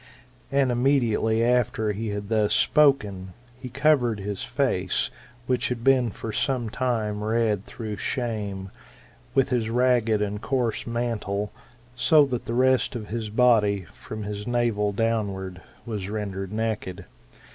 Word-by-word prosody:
And 135 -2 +3
immediately 120 -3 +2
after 120 -3 +2
he 110 +2 -4
had 105 -1 -4
thus 110 -2 +2
spoken, 105 -11 +3 0.3
he 125 - -7
covered 130 -4 +2
his 100 0 -4
face, - - 0 0.3
which 125 0 0
had 120 -2 -3
been 130 -2 +4
for 110 +2 -6
some 125 -4 0
time 110 -4 -1
red 110 -2 0
through 110 -3 -6
shame, 105 -6 -3 0.6
with 135 - +3
his 120 -3 0
ragged 120 -3 +2
and 105 0 -2
coarse 120 -4 -1
mantle, 115 -4 -2 0.4
so 150 +4 +5
that 125 -3 -3
the 115 - -3
rest 130 +1 +3
of 110 -3 -6
his 110 0 -3
body, 105 -4 +3
from 110 -1 -7
his 105 +1 -5
navel 120 -4 +1
downward, 100 -4 -2 0.2
was 105 -4 -4
rendered 100 -3 -4
naked. 110 -4 -3
115 Hz, 135 wpm, -25 LUFS, 105-125 Hz, 0.6 s, so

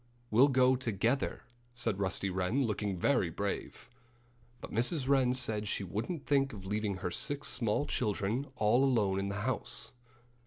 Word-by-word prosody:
"We'll 120 +6 +6
go 130 -1 +4
together," 120 +1 -1 0.3
said 115 -5 -1
Rusty 95 0 -1
Wren, 95 +9 0
looking 105 -3 -2
very 95 -2 +2
brave. 100 +4 -4 0.7
But - - -9
Mrs. 125 +5 +1
Wren 135 -3 +4
said 110 -4 0
she 100 - -2
wouldn't 115 - -4
think 135 -3 +2
of 95 -3 -9
leaving 105 0 -1
her 90 -1 -3
six 140 +6 -1
small 115 +4 0
children 110 +3 -1
all 110 +5 +3
alone 105 -8 +2
in 100 0 -2
the 100 +1 -3
house. 130 -1 -2
110 Hz, 155 wpm, -32 LUFS, 100-130 Hz, 0.7 s, We'll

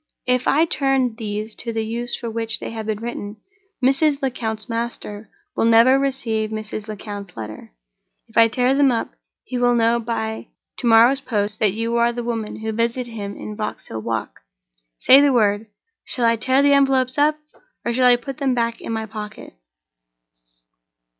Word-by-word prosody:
"If 250 0 +1
I 310 +4 +4
turn 270 -6 +1
these 215 -1 -4
to 230 - -5
the 225 -1 -2
use 235 +2 -2
for 235 - -6
which 225 0 -3
they - - -6
have 220 -1 -6
been 215 -1 -2
written, 220 -3 -6 0.5
Mrs. 280 +1 +2
Lecount's 220 -4 -2
master 230 -2 -5 0.3
will - - +1
never 230 +4 +6
receive 230 -6 -1
Mrs. 215 0 -5
Lecount's 205 - -7
letter. 110 -1 -8 0.6
If - - -22
I 230 - +7
tear 250 +3 +1
them 275 -1 +4
up, 230 - -2 0.3
he 250 - -4
will 245 0 +3
know 230 0 +3
by 220 -1 -4 0.3
to 245 - -1
morrow's 235 +4 +6
post 210 -4 -2
that 210 -3 +2
you 230 +1 -1
are 235 0 +3
the 240 0 -5
woman 225 -2 -4
who 220 0 -2
visited 235 +2 -1
him 200 -3 -6
in 210 - -7
Vauxhall 205 - -5
Walk. 115 0 -4 0.6
Say 270 - +7
the 285 -1 +4
word! 210 -2 +2 0.4
Shall 245 - -2
I 230 0 +4
tear 260 +4 +2
the 285 0 +5
envelopes 270 -1 +2
up, 300 +1 +3 0.5
or 235 - 0
shall 250 +1 +4
I 245 - +7
put 250 +2 -7
them 270 -3 +1
back 230 -1 -1
in - - -5
my 220 -1 -2
pocket?" 215 0 -8
230 Hz, 180 wpm, -21 LUFS, 220-255 Hz, 0.6 s, I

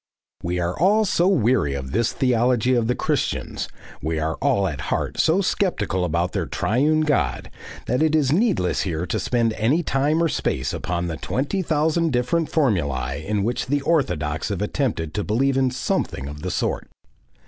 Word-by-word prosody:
We 90 +1 -2
are 85 +1 -1
all 210 +6 +4
so 180 -2 +2
weary 120 - +2
of 65 -1 -5
this 115 +3 +1
theology 125 -1 +2
of 120 -2 +2
the 125 - +1
Christians, - - -2 0.3
we 80 +2 -2
are 80 +1 -1
all 125 -9 +2
at 75 -6 -4
heart - - -2
so 170 +5 +3
sceptical 115 - 0
about 85 +1 0
their - - -2
Triune 150 +8 +1
God, 75 - 0 0.3
that 125 +4 0
it 155 0 +3
is 145 -4 +2
needless 175 - +2
here 85 -2 -2
to 85 - -2
spend 115 -2 +1
any 125 +11 +1
time 150 +4 +1
or - - +3
space 65 - -1
upon 90 -1 -2
the 80 -2 -3
twenty 145 - -2
thousand 160 -1 +1
different 125 +7 +1
formulae 70 - 0
in 105 -1 0
which 120 +4 -1
the 145 +2 +1
orthodox 90 - 0
have 100 -1 -2
attempted 105 - -2
to 105 - -1
believe 130 +7 +1
in 130 -1 +2
something 95 - -2
of 75 +1 -8
the 90 - -3
sort. - - -2
120 Hz, 180 wpm, -23 LUFS, -, 0.3 s, all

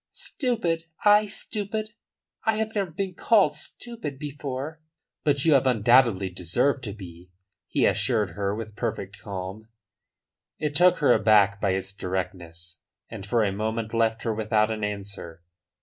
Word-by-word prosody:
"Stupid! 180 - -2 0.2
I 210 0 +6
stupid! 215 +1 -3 0.5
I 220 - +2
have 220 0 -2
never 200 -4 -1
been 185 +3 -3
called 210 +3 +4
stupid 230 - -7
before." 145 +1 -5 0.4
"But 145 -1 +2
you 160 - +6
have 135 -1 +4
undoubtedly 115 -5 +4
deserved 120 - 0
to 100 - -4
be," 90 -3 -11 0.4
he - - +2
assured 110 -7 +1
her 100 +3 -2
with 110 -1 -7
perfect - - -4
calm. 100 +2 -6 0.9
It 150 -1 -2
took 180 +3 +5
her 140 -4 +6
aback 100 -2 +4
by 100 -2 +2
its 95 +1 -3
directness, 85 -3 -5 0.3
and 105 -3 -8
for 115 +2 +2
a 100 - +1
moment 110 +2 -3
left 115 0 +1
her 115 - 0
without 110 0 +1
an 110 -1 -3
answer. 100 -5 -6
110 Hz, 150 wpm, -26 LUFS, 100-155 Hz, 0.9 s, I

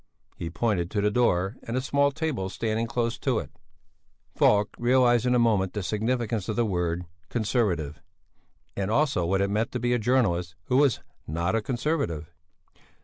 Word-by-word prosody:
He 85 - -5
pointed 90 -2 0
to 105 0 -1
the 105 +1 +2
door 105 -2 +1
and 115 +2 -4
a - - +3
small 140 +2 +2
table 140 -11 -2
standing 110 +2 -2
close 120 0 -1
to - - 0
it. - - -4 0.8
Falk 105 0 +4
realized 120 -1 +3
in 125 - +3
a - - +4
moment 105 -6 +2
the 105 - -3
significance 110 0 -1
of 110 - -1
the 120 - +2
word 90 -3 -1 0.2
"Conservative," 95 - -1 0.7
and 100 0 -2
also 115 - +1
what 95 +2 +1
it 100 0 0
meant 110 +3 0
to 125 - -1
be 120 +1 +1
a 120 - +2
journalist 100 -8 +1
who 125 +8 +1
was 140 -4 +3 0.3
not 85 +5 -1
a 115 - +1
Conservative. 120 - -2
110 Hz, 175 wpm, -26 LUFS, 95-125 Hz, 0.8 s, Falk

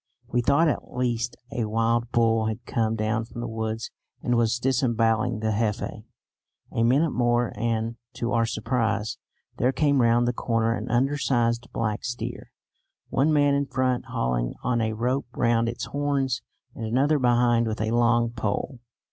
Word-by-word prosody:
We 120 - +2
thought 145 +7 +3
at 150 - -3
least 120 -1 -1 0.2
a 115 - -1
wild 115 +2 0
bull 115 -1 +2
had 110 +2 -4
come 115 -1 0
down 110 +1 0
from 115 +1 -10
the 120 - -3
woods 110 0 -3 0.3
and 120 - +1
was 115 0 +2
disembowelling 120 -3 +1
the 110 0 0
Jefe. 105 -1 -2 0.7
A 115 - 0
minute 140 +7 +3
more 120 -1 +1
and, 115 +1 -1 0.2
to 120 +1 -3
our 115 -1 +2
surprise, 115 -1 -1 0.4
there 125 +2 +2
came 140 0 +2
round 120 +1 +3
the 120 - +1
corner 115 -1 0
an - - -4
undersized 120 -2 +1
black 110 -2 -2
steer, 120 0 -5 0.6
one 140 +5 +2
man 145 -2 +4
in 140 0 +1
front 130 -2 0
hauling - - -1
on 120 -2 +1
a 110 0 0
rope 125 +5 -1
round 115 0 +2
its 120 - -4
horns, 140 -3 -1 0.3
and 115 - -7
another 135 +7 +2
behind 120 -2 +3
with 110 - -3
a 110 +1 -1
long 120 0 +3
pole. 120 +3 -3
120 Hz, 165 wpm, -25 LUFS, 115-125 Hz, 0.7 s, man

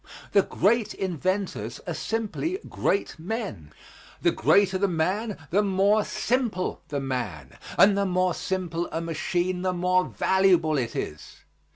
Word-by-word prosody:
The 200 - +6
great 215 +3 +1
inventors 180 - -2
are 175 - -3
simply 225 - -2
great 200 -3 -1
men; 185 - -5 0.5
the - - +3
greater 190 - +3
the 200 - +3
man 190 +6 -1
the 200 +4 +4
more 200 +2 +3
simple 230 -8 -1
the 145 -3 -2
man; 125 - -4 0.2
and 200 0 +7
the 200 0 +1
more 185 0 +1
simple 175 -2 -3
a - - -2
machine, 175 +2 -1
the 185 0 0
more 180 +1 +2
valuable 180 -6 +3
it 115 -2 -3
is. 75 0 -6
185 Hz, 140 wpm, -26 LUFS, 165-200 Hz, 0.5 s, and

